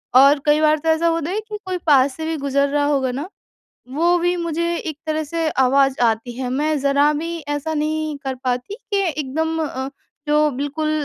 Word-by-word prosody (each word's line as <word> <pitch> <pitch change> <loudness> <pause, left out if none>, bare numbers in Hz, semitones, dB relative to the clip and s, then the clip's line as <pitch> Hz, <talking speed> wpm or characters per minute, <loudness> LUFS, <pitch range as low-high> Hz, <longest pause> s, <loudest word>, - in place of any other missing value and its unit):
और 280 +2 +7
कई 295 +1 +4
बार 310 0 +4
तो 320 - -1
ऐसा 320 +1 +3
होता 330 -1 0
है 420 - -1
कि 420 - -4
कोई 370 -1 -2
पास 270 -2 +4
से 320 - -4
भी 320 0 -1
गुजर 280 0 +1
रहा 290 0 +1
होगा 270 -3 +1
ना 285 +7 -4 0.7
वो 340 +4 +3
भी 350 +1 +1
मुझे 340 0 -1
एक 310 -3 -5
तरह 310 0 -1
से 325 +1 -1
आवाज़ 270 0 +3
आती 225 +2 -4
है। 250 - -2
मैं 295 +3 0
ज़रा 280 +2 +3
भी 335 0 -4
ऐसा 290 +2 -2
नहीं 310 0 -1
कर 265 -1 -2
पाती 250 +9 -2
कि 405 -4 -2
एकदम 320 +3 -2
अ, 265 -1 -4 0.4
जो 300 0 +3
बिल्कुल 300 +2 -2
300 Hz, 200 wpm, -20 LUFS, 275-325 Hz, 0.7 s, और